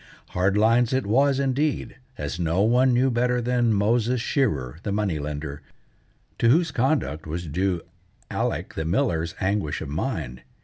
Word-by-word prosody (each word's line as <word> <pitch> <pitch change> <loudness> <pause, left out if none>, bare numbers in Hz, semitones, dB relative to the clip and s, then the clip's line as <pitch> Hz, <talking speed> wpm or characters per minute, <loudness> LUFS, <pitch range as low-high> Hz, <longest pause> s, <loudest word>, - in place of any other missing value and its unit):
Hard 95 +3 +1
lines 115 +3 +3
it 130 0 +1
was, 135 +6 +3
indeed, 140 +2 -1 0.2
as 75 +3 -4
no 85 +3 +1
one 125 +4 +4
knew 130 +2 +3
better 125 +1 +1
than 120 -1 +1
Moses 115 +4 +2
Shearer, 80 - -1
the 100 - -3
money 100 -6 0
lender, 75 0 -5 0.8
to 115 - +4
whose 165 +4 +3
conduct 125 - 0
was 85 +3 -4
due 90 +3 -1 0.5
Alec - - -2
the 80 - -3
miller's 85 - 0
anguish 95 -6 -1
of 80 - -6
mind. 65 -3 -3
105 Hz, 150 wpm, -24 LUFS, 80-125 Hz, 0.8 s, one